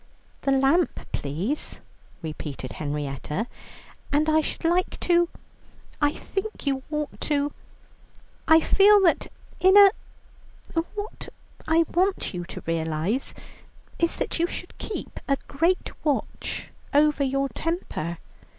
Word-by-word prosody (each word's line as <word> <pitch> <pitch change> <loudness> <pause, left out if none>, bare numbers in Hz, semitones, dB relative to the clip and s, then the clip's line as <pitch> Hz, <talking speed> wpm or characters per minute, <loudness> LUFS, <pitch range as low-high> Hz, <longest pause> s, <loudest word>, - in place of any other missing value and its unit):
"The 275 - +1
lamp, 275 +6 +3
please," 175 - -2 0.4
repeated 150 -4 -5
Henrietta, 150 - -3 0.7
"and 300 +2 +3
I 315 0 +4
should 315 - -4
like 350 +2 +1
to 345 -1 +3 0.7
I 290 - +5
think 390 +7 -5
you 270 -1 +1
ought 300 -1 -3
to 290 -1 0 0.9
I 320 0 +7
feel 410 +4 +6
that 345 -4 +3 0.3
in 380 +2 +6
a 400 -1 +10 1.0
what 415 +1 -5 0.4
I 325 +1 +4
want 375 - +1
you 175 -1 -4
to - - -8
realize 165 - -1 0.6
is 335 0 +2
that - - -2
you 340 - +3
should - - -7
keep 435 - -5
a 275 - +2
great 335 +6 +1
watch 290 -3 -2 0.2
over 295 0 +4
your 275 +1 +1
temper. 265 - -3
295 Hz, 120 wpm, -25 LUFS, -, 1.0 s, a